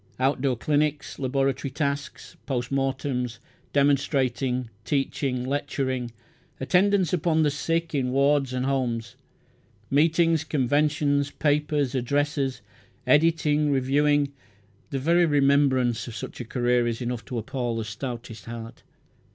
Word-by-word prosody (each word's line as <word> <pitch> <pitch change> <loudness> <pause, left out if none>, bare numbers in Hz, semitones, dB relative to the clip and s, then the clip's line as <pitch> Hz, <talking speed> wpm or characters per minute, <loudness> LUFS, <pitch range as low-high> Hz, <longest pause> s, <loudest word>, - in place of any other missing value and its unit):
Outdoor 130 -1 +1
clinics, 150 +2 -1
laboratory 135 0 0
tasks, 140 0 -4
post 125 -2 -2
mortems, 135 -3 -1 0.3
demonstrating, 135 -3 +1
teaching, 135 -1 -1
lecturing, 130 -2 -2 0.5
attendance 185 +4 +2
upon 160 -2 +2
the 150 - +2
sick 165 +3 -1
in 130 -3 0
wards 140 0 +2
and 130 0 -1
homes, 120 -4 -1 0.8
meetings, 160 +2 +3
conventions, 145 0 +1
papers, 145 -2 0
addresses, 140 0 -1 0.4
editing, 150 -1 +3
reviewing, 140 +1 +2 0.6
the 140 - -2
very 170 +5 +3
remembrance 140 -5 +2
of 115 - -7
such - - -6
a - - -6
career 120 0 +1
is 115 -1 -2
enough 120 -2 -3
to 125 - -5
appall 120 +1 -3
the 110 - -3
stoutest 115 -1 -6
heart. 115 0 -8
140 Hz, 115 wpm, -25 LUFS, 125-145 Hz, 0.8 s, meetings